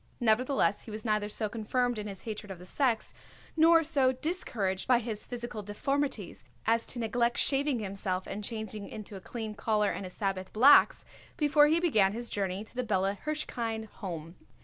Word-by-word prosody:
Nevertheless, 240 -1 +2
he - - -9
was 215 +1 -7
neither 210 -1 +1
so 215 +1 -2
confirmed 235 +2 -1
in 210 - -5
his 195 -2 -8
hatred 215 -2 -6
of 190 - -6
the 180 - -12
sex 235 +2 0 0.4
nor 330 +1 +6
so 280 -5 +3
discouraged 245 - -2
by 250 -1 +5
his 225 -3 -5
physical 240 -3 -5
deformities 215 0 -2 0.2
as 230 +1 +2
to - - -6
neglect 235 +1 0
shaving 280 -1 +2
himself 190 -3 -3
and 210 - -5
changing 215 -2 -5
into 210 -1 -8
a 190 - -8
clean 220 +1 -5
collar 210 0 +1
and - - -5
his 180 -1 -7
Sabbath 190 -2 -3
blacks 265 +7 +6 0.3
before 295 -2 +5
he 320 +2 +3
began 215 - +3
his 235 +1 -4
journey 195 0 -2
to 220 - -17
the 250 0 -2
Bella 195 -3 0
Hirshkind 230 -8 -3
Home. 165 -2 -6
220 Hz, 180 wpm, -30 LUFS, 205-255 Hz, 0.4 s, nor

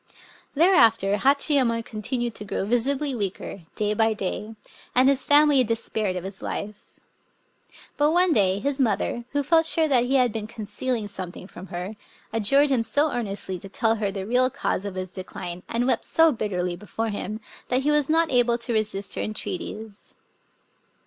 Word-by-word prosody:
Thereafter 230 - +4
Hachiyemon 265 -2 +2
continued 240 +2 -3
to 210 - -6
grow 195 -1 -3
visi 245 +5 +1
bly 285 0 -2
weaker, 200 -3 -4
day 210 0 0
by 220 +1 +2
day; 210 +3 -4 0.4
and 255 +1 +5
his 275 -1 +2
family 290 -2 +6
despaired 220 -4 -1
of 180 - -4
his 190 0 -8
life. 210 0 -6 1.1
But 295 +1 +3
one 350 +1 +3
day 195 -5 +3
his 275 +6 -1
mother, 235 0 0
who 285 0 0
felt 325 +2 +3
sure 320 -1 +2
that 250 -4 +3
he 265 +2 0
had 250 -4 +3
been 215 -2 -4
concealing 220 +1 -3
something 185 -3 -7
from 190 0 -11
her, 180 +5 -6 0.4
adjured 275 +7 +3
him 255 -3 +3
so 285 +7 +1
earnestly 200 -5 -4
to 195 - -10
tell 225 +3 +1
her 205 -2 -1
the 195 -1 -5
real 250 +4 +2
cause 205 - -2
of 200 -2 -5
his 185 -1 -5
decline, 180 -2 -6
and 235 +1 0
wept 260 - +1
so 325 0 +4
bitterly 180 -7 -2
before 220 +4 -4
him, 215 +1 -4 0.3
that 255 +1 0
he 300 - +2
was 295 -1 +2
not 325 +1 +2
able 240 -2 +3
to 235 0 -3
resist 210 -3 -1
her - - -3
entreaties. 215 0 -6
225 Hz, 175 wpm, -25 LUFS, 205-265 Hz, 1.1 s, family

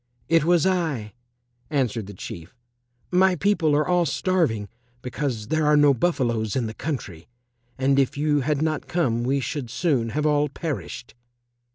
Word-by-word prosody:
"It 165 -2 +3
was 175 0 +3
I," 155 - -1 0.6
answered 125 -8 -1
the 100 - -9
Chief. 85 +3 -9 0.6
"My 185 +1 +4
people 175 -5 +2
are 150 +1 +1
all 175 -2 +2
starving 145 - 0 0.4
because 125 -4 -3
there 155 -1 +1
are 150 0 +5
no 145 -1 +6
buffaloes 120 - 0
in 130 -3 0
the 110 - -5
country, 110 - -5 0.5
and 135 +1 +2
if 135 +1 +1
you 150 0 +2
had 150 +2 0
not 155 -1 -2
come 120 -9 0
we 135 +3 +1
should 130 0 -4
soon 125 -2 0
have 150 +6 -2
all 150 -1 +2
perished." 145 -4 -5
145 Hz, 160 wpm, -24 LUFS, 120-160 Hz, 0.6 s, no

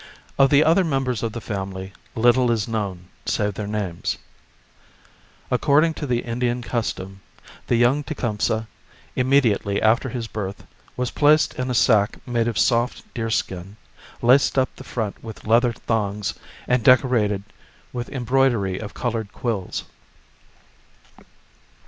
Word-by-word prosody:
Of 135 0 +6
the 145 +2 +5
other 165 +5 +4
mem 135 -5 0
bers 125 -4 -2
of 115 -2 -2
the 120 - -4
family 95 -2 -5 0.2
little 120 +2 +4
is 115 -2 0
known 100 -6 -4 0.2
save 105 0 0
their 100 +1 -5
names. 100 -5 -2 1.3
According 155 +3 +3
to 150 - -5
the 120 -2 +1
Indian 120 +1 -2
custom, 95 -5 -3 0.5
the - - +2
young 120 +5 +3
Tecumseh, 110 -6 -1 0.5
immediately 125 -7 +2
after 115 +4 +2
his 120 -2 -4
birth, 100 -3 -5 0.3
was 125 -1 -1
placed 150 +1 +4
in 130 0 -3
a 125 - -1
sack 105 -4 +3
made 120 -2 +1
of 115 - -2
soft 120 +1 +1
deerskin, 105 -4 -3 0.5
laced 130 +3 +4
up 130 -1 +1
the - - -10
front 110 -4 -4
with 110 -2 -9
leather 120 +3 +4
thongs 105 -3 -2 0.3
and 125 -2 +2
decorated 115 -5 +4 0.5
with 120 -1 -4
embroidery 120 -7 +1
of 105 - -8
coloured 115 -4 -2
quills. 110 -7 -3
115 Hz, 135 wpm, -23 LUFS, 105-125 Hz, 1.3 s, Of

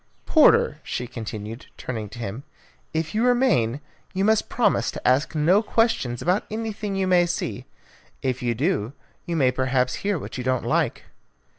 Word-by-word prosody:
Porter," - - +5
she 125 - -4
continued, 110 -1 -7
turning 110 -4 -5
to 115 - -11
him, 115 +1 -5 0.5
"if 160 0 -2
you 220 +2 +1
remain, 235 - +2 0.3
you 190 +1 +1
must 220 0 +2
promise 240 - +2
to - - -4
ask 135 +5 +2
no 170 +7 +4
questions 220 - 0
about 180 +4 +2
anything 215 -2 -4
you 195 0 +1
may 180 -2 +4
see. 170 - -3 0.6
If 130 -1 -1
you 120 -1 0
do, 135 - 0 0.3
you 170 - -1
may 130 -5 +3
perhaps 130 0 0
hear 200 -2 0
what 130 - -7
you - - -3
don't 130 0 0
like." - - 0
150 Hz, 165 wpm, -24 LUFS, 125-195 Hz, 0.6 s, Porter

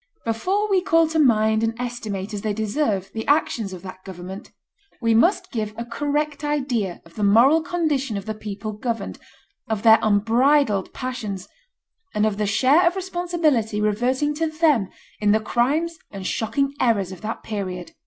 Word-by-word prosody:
Before 370 - 0
we 390 -3 +2
call 330 -3 +3
to 320 0 0
mind 220 -5 +3
and 225 +1 -1
estimate 220 -5 -4
as 205 - -4
they 215 0 -1
deserve 210 -3 -1
the 220 - -5
actions 245 -8 +1
of 185 -1 -9
that 185 0 -10
government, 190 +2 -8 0.5
we 230 -2 +2
must 340 - +3
give 215 -3 -3
a 235 - -4
correct 290 +4 -2
idea 260 -11 -1
of 165 - -18
the 210 - -4
moral 240 +10 +5
condition 300 -9 -1
of 195 - -6
the 220 - -3
people 210 0 -6
governed, 230 +1 -4 0.5
of 220 -1 -2
their 225 -1 +7
unbridled 225 +1 +2
passions, 215 -7 -5 0.7
and 210 0 +2
of 210 -2 0
the 210 -1 0
share 275 - +4
of 345 - +1
responsibility 345 - 0
reverting 245 +8 +1
to 325 +2 -1
them 310 - +2 0.3
in 210 -1 +3
the 215 - +3
crimes 300 +10 0
and 195 -2 -8
shocking 275 +8 -1
errors 205 -8 +1
of 185 - -10
that 220 +1 -5
period. 185 -4 -5
230 Hz, 170 wpm, -23 LUFS, 210-295 Hz, 0.7 s, their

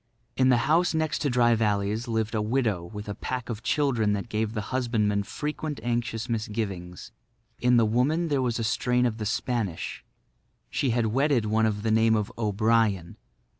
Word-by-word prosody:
In 130 0 +3
the 125 - +5
house 170 +2 +3
next 160 -1 0
to 145 - 0
Dry 120 -1 +4
Valley's 105 +1 0
lived 110 -1 -1
a 110 - 0
widow 110 -5 0
with 105 +3 -8
a 105 - -3
pack 125 +4 -5
of 115 -2 -4
children 120 -6 +1
that 100 +3 -3
gave 110 0 -1
the 105 -1 -5
husbandman 110 -5 +1
frequent 150 +6 -4
anxious 120 -1 -2
misgivings. 105 -6 -4 0.5
In 125 0 +4
the 115 - +5
woman 135 +10 +1
there 140 -3 +1
was 120 -3 0
a 115 - -2
strain 125 +2 +1
of 115 -2 -1
the 105 - -2
Spanish. 110 -6 -2 0.7
She 135 - 0
had 120 -1 +1
wedded 135 -3 +2
one 110 +1 +2
of 105 -1 -2
the 110 - +1
name 110 0 +4
of 105 -2 -1
O'Brien. 105 -4 +1
115 Hz, 180 wpm, -26 LUFS, 105-125 Hz, 0.7 s, the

